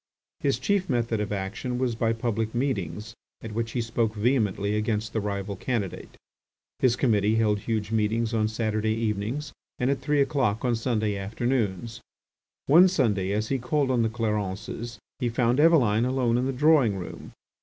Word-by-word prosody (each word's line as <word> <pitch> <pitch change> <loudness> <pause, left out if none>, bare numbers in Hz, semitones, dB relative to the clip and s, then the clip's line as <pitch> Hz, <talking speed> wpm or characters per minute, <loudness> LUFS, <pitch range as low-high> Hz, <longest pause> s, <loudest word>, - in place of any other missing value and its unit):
His 140 -4 +1
chief 185 +8 0
method 115 -3 0
of 105 0 -3
action 100 +5 -3
was 125 -2 0
by 115 0 0
public 115 -1 -2
meetings 110 - -2 0.3
at 115 - -6
which 115 +1 -3
he 120 - 0
spoke 115 -1 -1
vehemently 105 -3 +1
against 110 +1 -1
the 110 - 0
rival 100 -1 -3
candidate. 105 -2 -4 0.6
His 125 -2 +3
committee 110 -4 +2
held 105 -2 +2
huge 110 0 -2
meetings 110 +1 0
on 110 -1 +2
Saturday 110 0 -1
evenings 115 +6 -2 0.2
and 125 +1 +1
at 140 - -2
three 145 +1 +1
o'clock 130 -6 +1
on 120 -1 +2
Sunday 110 -3 -1
afternoons. 110 +1 -2 0.6
One 170 +6 +7
Sunday, 105 - +1
as 110 +1 -1
he 135 - 0
called 140 +2 0
on 125 -2 +2
the 110 - +1
Clarences, 110 0 -3 0.2
he 125 -3 0
found 120 +2 +1
Eveline 125 -9 +4
alone 125 -2 +1
in 130 - 0
the - - 0
drawing 135 -6 +3
room. 90 - -8
115 Hz, 165 wpm, -26 LUFS, 105-125 Hz, 0.6 s, One